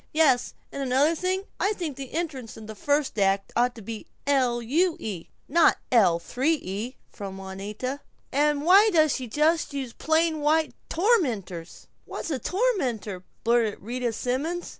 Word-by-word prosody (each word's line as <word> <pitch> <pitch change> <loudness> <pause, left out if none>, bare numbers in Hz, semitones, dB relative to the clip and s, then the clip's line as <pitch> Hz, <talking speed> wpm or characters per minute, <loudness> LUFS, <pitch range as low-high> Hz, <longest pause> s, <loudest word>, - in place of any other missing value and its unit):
"Yes, 280 -6 +3 0.2
and 280 - -5
another 275 +4 +3
thing, 370 +3 -1 0.2
I 410 - +2
think 335 -8 -4
the 270 -1 -7
entrance 290 -10 -4
in 220 - -9
the 220 - -7
first 285 +2 0
act 195 0 +1
ought 245 +1 +2
to 225 - -10
be 220 +1 -7 0.2
L. 260 -4 +2
U. 320 +9 +1
E., 195 - -5 0.2
not 335 +3 +4
L. 200 -9 +5
3 260 - 0
E.," 220 - -5
from 195 -2 -8
Juanita. 205 +8 -5 0.3
"And 295 +1 +2
why 390 +6 +7
does 310 -6 +4
she 255 -2 -5
just 300 +4 +1
use 260 -4 -4
plain 320 0 +1
white 310 +1 +2 0.2
tormenters?" 245 - 0 0.2
"What's - - -5
a 270 - -1
tormenter?" 255 - -1 0.2
blurted 230 -2 +2
Rita 240 +2 -2
Simons. 280 +10 -2
265 Hz, 160 wpm, -26 LUFS, 225-320 Hz, 0.3 s, why